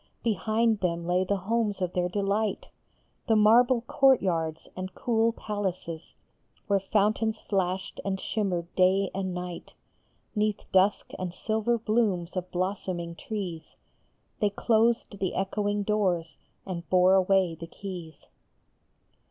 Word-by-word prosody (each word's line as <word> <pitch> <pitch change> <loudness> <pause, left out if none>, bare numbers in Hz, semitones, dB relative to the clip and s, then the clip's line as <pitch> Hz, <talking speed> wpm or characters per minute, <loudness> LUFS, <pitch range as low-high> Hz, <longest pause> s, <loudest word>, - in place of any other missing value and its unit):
Behind 220 +1 +1
them 170 -3 -1
lay 180 +1 +2
the 200 +2 0
homes 210 +1 -1
of 180 -2 -2
their 180 0 0
delight, 200 +2 -1 0.6
The 225 - +4
marble 235 +3 +5
courtyards 185 - +2
and 185 +1 -6
cool 230 -1 +2
palaces, 190 -7 -5 0.5
Where 200 -1 +2
fountains 215 +2 +1
flashed 190 -1 -2
and 190 -1 -2
shimmered 180 -5 -2
day 190 +1 +3
and 190 -1 -2
night 180 -1 -6 0.6
Neath 210 -2 0
dusk 190 +2 +3
and 185 -1 -3
silver 220 +3 0
blooms 215 -6 0
of 180 0 -3
blossoming 180 -2 -2
trees. 175 -4 -6 0.6
They 210 - +3
closed 225 0 +1
the 190 -3 -1
echoing 205 +1 -1
doors, 185 -6 0 0.3
and 175 -3 -6
bore 185 0 +5
away 190 -2 +3
the 165 +1 -8
keys. 175 -3 -8
195 Hz, 125 wpm, -28 LUFS, 180-215 Hz, 0.6 s, marble